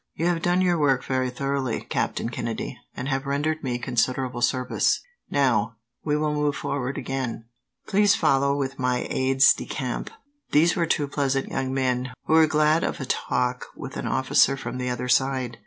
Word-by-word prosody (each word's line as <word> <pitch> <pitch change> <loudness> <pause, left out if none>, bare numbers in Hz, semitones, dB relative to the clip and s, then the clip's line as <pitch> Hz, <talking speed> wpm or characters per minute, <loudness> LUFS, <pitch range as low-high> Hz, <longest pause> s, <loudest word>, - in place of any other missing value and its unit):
"You 165 - -2
have 175 -1 +1
done 175 +2 +2
your 175 -2 +2
work 135 -4 +2
very 130 -1 0
thoroughly, 135 0 -2
Captain - - -2
Kennedy, - - -4 0.2
and 125 - -4
have 135 0 -1
rendered 155 +3 -1
me 125 -3 -1
considerable 125 +1 -1
service. 125 +1 +1 0.3
Now, 125 -5 +1 0.3
we 150 -1 +1
will 150 0 0
move 150 -1 0
forward 140 -1 -3
again. 130 -4 -4 0.4
Please 205 0 +4
follow 140 -2 +2
with 135 -1 -3
my 125 -1 0
aides 135 +1 +5
de - - -8
camp." - - -3 0.4
These 165 +3 +4
were 170 -3 +1
two 150 -3 +1
pleasant 140 -1 -1
young 130 -1 -2
men, 130 -1 -1
who - - +1
were 160 -1 +6
glad 155 +1 +3
of - - -2
a 135 - -4
talk 125 0 -1
with - - -8
an - - -3
officer 135 +1 +3
from 130 -1 -5
the 125 0 -2
other 125 0 -3
side. 130 -2 +1
135 Hz, 180 wpm, -25 LUFS, 125-150 Hz, 0.4 s, were